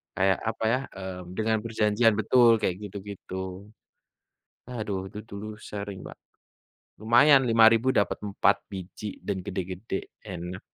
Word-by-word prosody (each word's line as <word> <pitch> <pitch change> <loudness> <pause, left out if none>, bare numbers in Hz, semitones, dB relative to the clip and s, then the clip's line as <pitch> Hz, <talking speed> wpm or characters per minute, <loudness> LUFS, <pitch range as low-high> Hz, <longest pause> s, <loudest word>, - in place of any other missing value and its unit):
kayak, 95 0 +3
apa 110 - -5
ya, 130 - +2 0.2
eee, 95 -1 -6 0.2
dengan 110 0 +1
perjanjian 110 0 +3
betul, 120 +2 +5
kayak 90 - 0
gitu-gitu. 95 -1 -7 1.0
Aduh 105 -5 -3
itu 105 - -7
dulu 100 +1 -6
sering, 100 -2 -6
Mbak, - - -9 0.9
lumayan 135 +5 +6
Rp5.000 115 +2 +5
dapat 100 - +2
4 100 - +3
biji 95 +2 -7
dan 100 -2 -1
gede-gede, 95 +2 -4 0.2
enak. 90 -1 -6
105 Hz, 125 wpm, -27 LUFS, 95-115 Hz, 1.0 s, lumayan